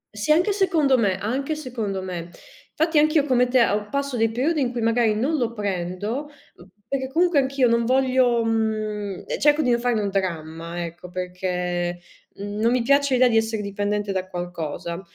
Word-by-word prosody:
Sì, 210 +8 -1
anche 355 +6 +4
secondo 335 -9 +2
me, 195 -4 +1
anche 270 +9 -2
secondo 225 -9 -4
me. 175 -2 -5 0.5
Fatti 320 -1 +2
anch'io 305 -1 +3
come 250 -3 +3
te 245 -1 +4
o 210 0 -2
passo 280 -2 -2
dei 225 -1 +2
periodi 280 +7 0
in 250 -1 0
cui 240 -2 -3
magari 230 -1 +2
non 285 +8 0
lo 235 -3 -1
prendo, 205 +7 -3 0.6
perché 265 0 -2
comunque 340 0 +3
anch'io 265 -1 +2
non 235 0 +2
voglio, 255 -2 +3
mhmm, 215 -3 -2
ehm, - - -3
cerco 295 +1 +4
di 250 - +2
non 235 - +2
farne 240 -3 0
un 200 - -1
dramma, 170 -2 -3
ecco, 175 +2 -10
perché, 180 -1 -3 0.4
mhmm, 205 +1 -6
non 230 +1 +3
mi 250 -2 +1
piace 280 0 +3
l'idea 250 0 +5
di 225 -2 +2
essere 220 -1 0
dipendente 205 0 -2
da 185 -1 -2
qualcosa. 170 -1 -5
225 Hz, 180 wpm, -23 LUFS, 190-265 Hz, 0.6 s, l'idea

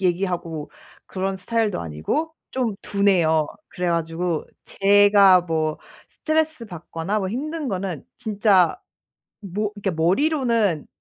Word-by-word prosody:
얘기하고 175 -4 -2 0.4
그런 190 0 -3
스타일도 215 +2 -1
아니고 85 - -3 0.2
좀 245 -5 -1
둔해요. 175 -6 +2 0.2
그래 180 -1 -4
가지고 165 0 -1 0.2
제가 200 -2 +5
뭐 160 -2 -1 0.3
스트레스 315 -4 -1
받거나 175 +2 -4
뭐 190 - -2
힘든 300 +5 -3
거는 185 - -4
진짜 205 - +2 0.6
뭐 205 +1 -3
이렇게 200 -1 -1
머리로는 215 - +1
195 Hz, 255 characters per minute, -23 LUFS, 170-215 Hz, 0.6 s, 제가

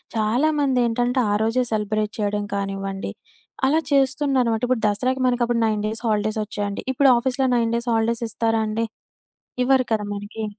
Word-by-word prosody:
చాలామందేంటంటే 245 0 +1
ఆ - - +2
రోజే 230 +3 +1
సెలబ్రేట్ 215 0 -1
చేయడం 205 0 -1
కానివ్వండి 195 0 -3 0.5
అలా 295 +4 +3
చేస్తున్నారు 270 -2 +2
మాట. 220 - -2
ఇప్పుడు 250 -2 0
దసరాకి 255 +6 0
మనకప్పుడు 240 -1 +1
9 215 -1 0
డేస్ 220 +1 -4
హాలిడేస్ 215 0 0
ఒచ్చాయండి. 205 -1 -4
ఇప్పుడు 270 +1 +4
ఆఫీస్‌లొ 260 +2 0
9 230 -1 +1
డేస్ 235 +1 -2
హాలిడేస్ 230 +1 0
ఇస్తారా 225 0 0
అండి? 220 +2 -1 0.8
ఇవ్వరు 260 -1 +3
కదా! 215 -1 0
మనకి. 205 +2 -6
230 Hz, 145 wpm, -22 LUFS, 215-255 Hz, 0.8 s, ఇప్పుడు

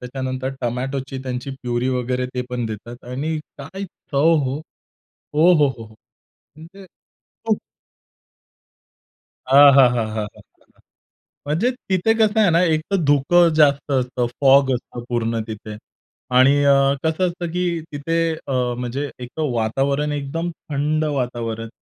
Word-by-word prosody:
त्याच्यानंतर 130 +1 -4
टोमॅटोची 130 +2 -3
त्यांची 125 +1 -5
प्युरी 125 -2 -2
वगैरे 125 0 -1
ते 125 - -1
पण 120 -2 -2
देतात 115 +3 -8
आणि 155 +5 -2 0.2
काय 190 +8 -7
चव 160 -2 0
हो. 135 +3 -3 0.7
ओहोहोहो! 150 -8 +3 0.7
म्हणजे 185 +5 -13 0.6
खूप - - +2 2.0
आहाहाहाहाहाहा! 125 -7 +5 1.1
म्हणजे 170 - +1
तिथे 225 -4 0
कसं 220 0 +3
आहे 200 - +4
ना 170 +1 +3
एक 160 -2 +2
तर 195 - +2
धुकं 165 +5 +4
जास्त 145 -2 +3
असतं. 125 -2 0
फॉग 135 0 +5
असतं 120 0 -7
पूर्ण 115 -1 -1
तिथे 110 -1 -8 0.6
आणि 140 +3 +5
अ, 140 0 +4
कसं 160 +3 +1
असतं 175 -1 -4
की 175 -2 -1
तिथे 165 +4 -2 0.3
अ, 135 - -3 0.3
म्हणजे 130 +4 -3
एक 125 - -13 0.2
वातावरण 140 +6 0
एकदम 145 +4 -3 0.2
थंड 150 +2 0
वातावरण 120 -5 -3
140 Hz, 120 wpm, -21 LUFS, 125-155 Hz, 2.0 s, आहाहाहाहाहाहा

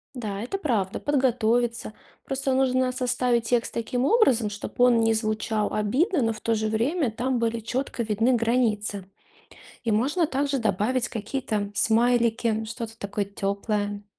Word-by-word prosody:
Да, 210 -5 -4
это 250 - -3
правда, 225 - -1
подготовиться. 240 -5 +1 0.3
Просто 270 0 -1
нужно 260 -1 +2
составить 250 -2 0
текст 240 -1 0
таким 245 +2 -1
образом, 270 - +3
чтоб 205 +3 -8
он 245 -2 +5
не 225 0 +3
звучал 215 -1 -1
обидно, 275 - +1
но 225 0 +1
в 215 - -11
то 230 - +1
же 220 0 -1
время 245 +6 0
там 250 +3 -1
были 230 0 0
четко 245 +3 -3
видны 225 +3 +1
границы. 225 -4 0 0.8
И 230 - 0
можно 275 +11 +2
также 280 -1 -1
добавить 225 +3 0
какие-то 215 -2 -3
смайлики, 230 0 +2
что-то 225 0 -7
такое 200 0 -2
теплое. 205 +1 -3
230 Hz, 145 wpm, -25 LUFS, 215-255 Hz, 0.8 s, он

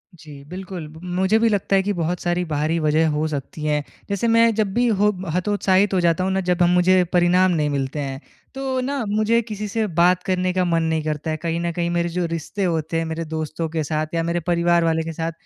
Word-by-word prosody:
जी, 150 -4 -12
बिल्कुल। 180 -2 -7
म 160 - -12 0.2
मुझे 190 +4 +3
भी 230 0 +3
लगता 200 -1 +1
है, 190 - +3
कि 205 +1 -1
बहुत 175 0 -2
सारी 175 0 0
बाहरी 155 +1 -1
वजह 155 +1 +2
हो 150 +1 0
सकती 150 +1 -5
हैं। 150 -1 +1 0.3
जैसे 200 +3 0
मैं 230 0 +4
जब 210 -3 0
भी 245 0 +2
हो 210 -1 +3 0.2
हतोत्साहित 195 0 +2
हो 185 - +3
जाता 170 +1 +2
हूँ 190 - 0
ना, 190 0 0
जब 180 0 +1
हम 175 - +4
मुझे 180 +1 +4
परिणाम 180 +1 +4
नहीं 155 -3 +1
मिलते 140 +1 -2
हैं। 135 -1 -4 0.4
तो 265 -1 -2
ना 275 -1 -2
मुझे 215 +3 +2
किसी 210 -1 -4
से 220 +1 -1
बात 180 +1 +4
करने 185 -1 0
का 185 - +1
मन 165 -1 +1
नहीं 160 -1 0
करता 155 0 -3
है, 155 - -2
कहीं 165 +1 -2
न 170 - -1
कहीं 170 0 -2
मेरे 170 0 0
जो 175 +1 -1
रिश्ते 165 +4 -4
होते 165 -2 -1
हैं, 165 - -1
मेरे 160 +1 -4
दोस्तों 160 +1 -3
के 160 -1 -2
साथ 155 +1 -3
या 165 -1 0
मेरे 170 +1 -1
परिवार 170 0 +3
वाले 160 -1 +1
के 165 - -5
साथ 165 +1 -3
175 Hz, 240 wpm, -22 LUFS, 160-190 Hz, 0.4 s, मैं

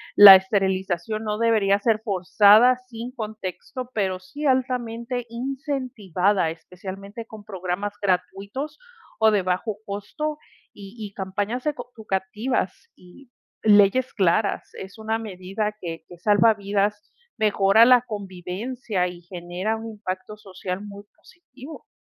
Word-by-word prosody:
la 200 -2 +12
esterilización 190 +1 0
no 210 0 -2
debería 215 -4 +3
ser 215 0 +1
forzada 210 +5 +5
sin 235 0 -7
contexto, 220 +3 -6
pero 190 -3 0
sí 285 +7 -8
altamente 250 -2 -1
incentivada, 235 - -1
especialmente 195 +6 -9
con 220 -2 -12
programas 190 0 -3
gratuitos 200 +9 -2 0.4
o 220 0 +5
de 205 -2 +2
bajo 185 +4 -2
costo 210 +10 -4 0.4
y 200 -1 -11
y 205 -2 -7
campañas 205 +6 -3
eco 250 -5 -3
educativas 210 +1 -3
y 210 +9 -18 0.3
leyes 210 +4 +4
claras, 200 +1 +1
es 190 +2 -9
una 220 +1 -1
medida 210 0 -4
que 165 -2 -6
que 175 - -13
salva 210 +4 +4
vidas, 205 0 -2 0.3
mejora 210 +1 +5
la 250 -1 +6
convivencia 200 +1 -3
y 175 -1 -9
genera 175 +4 -4
un 225 0 -7
impacto 210 +1 -6
social 185 -2 -6
muy 200 0 -10
positivo. 280 -3 -14
210 Hz, 125 wpm, -24 LUFS, 190-230 Hz, 0.4 s, la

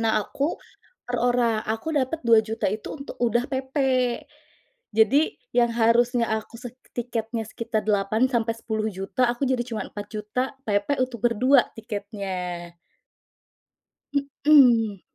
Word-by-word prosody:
Nah, 220 -2 +1
aku 285 - -2 0.5
per 245 - -3
orang, 240 -2 +2
aku 225 +9 -2
dapat 290 +2 0
Rp2.000.000. 225 -1 +3
itu 215 0 -5
untuk 275 -1 -9
udah 240 0 +2
PP. 265 +1 -4 1.2
Jadi, 265 +8 +4 0.2
yang 240 -1 +5
harusnya 235 +1 +3
aku 220 +1 -4
sek 250 -1 -9 0.2
tiketnya 230 -2 -3
sekitar 225 0 -3
Rp8.000.000-Rp10.000.000, 220 0 0
aku 240 +3 -2
jadi 255 -2 +1
cuma 225 -3 -3
Rp4.000.000, 210 +4 -4
PP 205 +6 +1
untuk 250 -4 -4
berdua 250 +4 +4
tiketnya. 195 -5 -5 1.7
Mhm. 235 -9 +6
230 Hz, 110 wpm, -25 LUFS, 215-250 Hz, 1.7 s, Mhm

